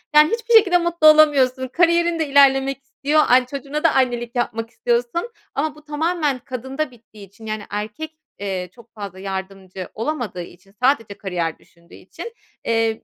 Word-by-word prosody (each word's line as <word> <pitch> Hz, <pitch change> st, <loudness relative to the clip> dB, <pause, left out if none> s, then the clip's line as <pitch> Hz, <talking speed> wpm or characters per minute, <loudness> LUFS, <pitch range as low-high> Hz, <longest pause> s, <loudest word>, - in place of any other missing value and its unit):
Yani, 300 Hz, +1 st, +7 dB
hiçbir 465 Hz, 0 st, -1 dB
şekilde 400 Hz, -6 st, +7 dB
mutlu 340 Hz, -2 st, +2 dB
olamıyorsun. 280 Hz, -4 st, +5 dB
Kariyerin 340 Hz, +3 st, +2 dB
de 315 Hz, -, 0 dB
ilerlemek 275 Hz, -1 st, +4 dB
istiyor, 280 Hz, +3 st, +1 dB
ay, 250 Hz, 0 st, +5 dB
çocuğuna 280 Hz, +3 st, -5 dB
da 330 Hz, -, +4 dB
annelik 240 Hz, -2 st, 0 dB
yapmak 230 Hz, -2 st, -2 dB
istiyorsun. 240 Hz, -, -1 dB, 0.2 s
Ama 295 Hz, +2 st, -1 dB
bu 305 Hz, -, -17 dB
tamamen 300 Hz, -2 st, -1 dB
kadında 265 Hz, +4 st, -4 dB
bittiği 220 Hz, -4 st, -15 dB
için 205 Hz, +4 st, -16 dB
yani, 215 Hz, -1 st, -4 dB
erkek, 210 Hz, +10 st, -5 dB, 0.3 s
eee, 190 Hz, -3 st, -3 dB
çok 235 Hz, -1 st, -18 dB
fazla 200 Hz, -4 st, -8 dB
yardımcı 190 Hz, -1 st, -6 dB
olamadığı 230 Hz, -7 st, -3 dB
için, 180 Hz, +3 st, -13 dB
sadece 230 Hz, -6 st, +1 dB
kariyer 175 Hz, -4 st, -3 dB
düşündüğü 170 Hz, 0 st, -20 dB
için, 470 Hz, -, -10 dB, 0.3 s
eee, 225 Hz, -1 st, 0 dB
255 Hz, 155 wpm, -21 LUFS, 215-305 Hz, 0.3 s, Yani